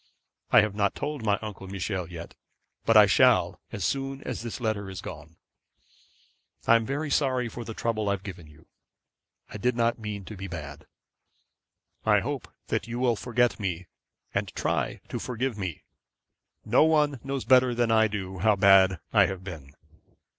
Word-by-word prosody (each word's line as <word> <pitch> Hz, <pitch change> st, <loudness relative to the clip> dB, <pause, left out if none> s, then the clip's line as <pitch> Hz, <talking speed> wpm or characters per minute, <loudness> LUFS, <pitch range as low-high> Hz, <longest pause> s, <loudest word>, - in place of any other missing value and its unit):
I -, -, +7 dB
have 105 Hz, -1 st, -1 dB
not 100 Hz, -1 st, 0 dB
told 145 Hz, -6 st, -4 dB
Uncle 100 Hz, -2 st, -2 dB
Michel 95 Hz, -2 st, -3 dB
yet, 85 Hz, -1 st, -8 dB, 0.5 s
but -, -, +5 dB
I -, -, +9 dB
shall -, -, +3 dB
as 100 Hz, -4 st, -3 dB
soon 135 Hz, +4 st, -2 dB
as -, -, -4 dB
this 120 Hz, +2 st, -6 dB
letter 110 Hz, -4 st, -2 dB
is 95 Hz, -, -7 dB
gone. 75 Hz, +2 st, -9 dB, 1.3 s
'I 115 Hz, -, +6 dB
am 115 Hz, -1 st, +2 dB
very, 140 Hz, -, -1 dB
very 155 Hz, -, -3 dB
sorry 130 Hz, -4 st, +1 dB
for 120 Hz, +1 st, -7 dB
the 115 Hz, -1 st, -7 dB
trouble 110 Hz, -3 st, -1 dB
I -, -, +2 dB
have 95 Hz, -1 st, -5 dB
given 90 Hz, -5 st, -8 dB
you. 75 Hz, +1 st, -18 dB, 0.9 s
I -, -, -6 dB
did 125 Hz, +3 st, 0 dB
not 120 Hz, 0 st, +1 dB
mean 105 Hz, -3 st, -5 dB
to 105 Hz, -, -8 dB
be 95 Hz, 0 st, -6 dB
bad. 75 Hz, -3 st, -8 dB, 1.2 s
I -, -, +4 dB
hope -, -, -4 dB, 0.2 s
that 100 Hz, -, -1 dB
you 120 Hz, 0 st, -4 dB
will 125 Hz, -2 st, +2 dB
forget 120 Hz, 0 st, 0 dB
me, 95 Hz, -3 st, -3 dB, 0.5 s
and -, -, 0 dB
try -, -, -1 dB
to -, -, -4 dB
forgive 125 Hz, 0 st, -2 dB
me. 95 Hz, -6 st, -5 dB, 0.8 s
No -, -, +5 dB
one 150 Hz, -4 st, +2 dB
knows 135 Hz, -1 st, -3 dB
better 125 Hz, -1 st, +5 dB
than 120 Hz, -1 st, +1 dB
I 110 Hz, 0 st, +5 dB
do 95 Hz, -3 st, -5 dB
how 105 Hz, +3 st, +4 dB
bad 95 Hz, -2 st, +5 dB
I -, -, +6 dB
have 95 Hz, -1 st, -6 dB
been. 80 Hz, -8 st, -9 dB
105 Hz, 175 wpm, -27 LUFS, 95-120 Hz, 1.3 s, I